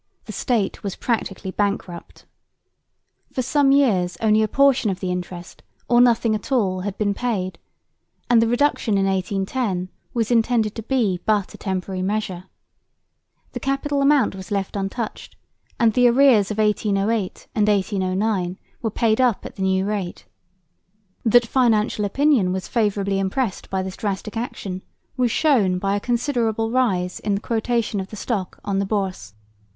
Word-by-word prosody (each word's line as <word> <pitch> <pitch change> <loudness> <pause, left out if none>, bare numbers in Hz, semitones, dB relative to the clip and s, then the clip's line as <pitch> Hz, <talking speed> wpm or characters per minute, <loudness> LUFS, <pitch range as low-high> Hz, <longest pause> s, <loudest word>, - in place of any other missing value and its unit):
The - - -7
State 225 -6 -1
was 200 -2 -4
practically 200 -5 -2
bankrupt. 200 -4 -3 1.1
For 255 - -1
some 275 +2 +3
years 205 -11 +2
only 215 -1 +3
a 215 - +2
portion 270 -3 +3
of 190 -1 -3
the 185 -1 -2
interest 180 -1 -6 0.3
or 240 0 +5
nothing 235 -2 +3
at 215 +5 -4
all 195 -8 +1
had 195 +1 -4
been 205 -1 +1
paid; 195 -6 -2 0.7
and 240 -2 +5
the 230 - +3
reduction 240 -4 +1
in 195 - +2
1810 195 +1 -1 0.2
was 230 -1 -1
intended 225 -2 +2
to 225 - -6
be 220 -6 0
but 210 -3 +1
a - - -10
temporary 190 -1 -3
measure. 190 -2 -2 1.1
The - - -5
capital 280 +1 -1
amount 275 -4 +3
was 190 -2 -9
left 200 -1 -2
untouched, 200 +3 -4 0.4
and 230 -3 +4
the 245 +1 +5
arrears 240 -5 +5
of 210 - -4
1808 210 -1 0
and 210 -1 +2
1809 190 -1 0 0.2
were 225 - 0
paid 220 +2 +1
up 245 -5 +1
at - - -8
the - - -7
new 190 0 +1
rate. 200 -4 -4 1.0
That 240 +1 +5
financial 220 -4 +2
opinion 250 -3 +2
was 190 0 -3
favourably 200 -3 0
impressed 195 +2 -2
by 190 -1 -1
this 190 0 -6
drastic 205 +1 -3
action 200 -5 -4 0.3
was 250 -2 +2
shown 225 -10 +2
by 195 +2 0
a - - 0
considerable 230 -2 0
rise 190 -8 0
in 205 -1 -1
the 200 - -3
quotation 230 -2 -1
of 190 - -4
the 215 - -9
Stock 200 -3 -3
on 200 -1 0
the 200 - 0
Bourse. 190 - -3
210 Hz, 160 wpm, -22 LUFS, 190-235 Hz, 1.1 s, or